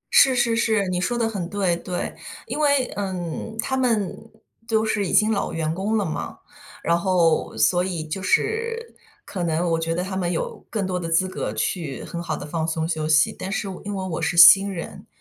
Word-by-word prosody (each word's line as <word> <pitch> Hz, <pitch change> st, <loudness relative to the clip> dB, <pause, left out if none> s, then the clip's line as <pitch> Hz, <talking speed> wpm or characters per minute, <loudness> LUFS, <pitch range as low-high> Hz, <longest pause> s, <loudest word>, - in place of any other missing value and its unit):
是 265 Hz, -2 st, +7 dB
是 240 Hz, -2 st, +2 dB
是， 220 Hz, -3 st, +1 dB
你 180 Hz, -1 st, -1 dB
说 240 Hz, +6 st, -1 dB
得 230 Hz, -1 st, +1 dB
很 195 Hz, -6 st, -4 dB
对， 195 Hz, -4 st, +1 dB
对。 175 Hz, +1 st, -4 dB, 0.3 s
因 -, -, -4 dB
为， 285 Hz, -3 st, +3 dB
嗯， 190 Hz, +1 st, -4 dB
他 265 Hz, +4 st, -1 dB
们， 230 Hz, -7 st, +1 dB, 0.5 s
都 220 Hz, -1 st, +1 dB
是 210 Hz, -2 st, 0 dB
已 -, -, -3 dB
经 215 Hz, +1 st, +4 dB
老 210 Hz, -, -1 dB
员 160 Hz, -1 st, -1 dB
工 200 Hz, +5 st, -1 dB
了 205 Hz, -, 0 dB
嘛， 155 Hz, -, -5 dB, 0.5 s
然 170 Hz, -, +3 dB
后， 170 Hz, -2 st, +1 dB
所 180 Hz, -1 st, +3 dB
以 180 Hz, -4 st, -3 dB
就 175 Hz, +5 st, -4 dB
是， 460 Hz, -, -1 dB, 0.3 s
可 180 Hz, -, -4 dB
能 170 Hz, +1 st, 0 dB
我 165 Hz, -, +1 dB
觉 165 Hz, 0 st, -1 dB
得 180 Hz, -, -1 dB
他 190 Hz, +1 st, -5 dB
们 180 Hz, -2 st, -1 dB
有， 165 Hz, -, -4 dB
更 210 Hz, -4 st, -2 dB
多 180 Hz, -1 st, -2 dB
的 165 Hz, -2 st, -4 dB
资 165 Hz, +3 st, +2 dB
格 185 Hz, -, -4 dB
去 160 Hz, -8 st, -3 dB
很 170 Hz, -, -6 dB
好 170 Hz, -, -3 dB
地 -, -, -7 dB
放 160 Hz, +1 st, -2 dB
松 160 Hz, 0 st, -1 dB
休 160 Hz, -2 st, -2 dB
息。 155 Hz, 0 st, +4 dB
但 190 Hz, -, -5 dB
是 200 Hz, -, -2 dB
我 190 Hz, -2 st, -7 dB
因 205 Hz, 0 st, -3 dB
为 190 Hz, -1 st, -3 dB
我 170 Hz, -2 st, -3 dB
是 165 Hz, +2 st, -1 dB
新 195 Hz, +3 st, +9 dB
人， 175 Hz, -3 st, -7 dB
185 Hz, 235 characters per minute, -23 LUFS, 170-215 Hz, 0.5 s, 新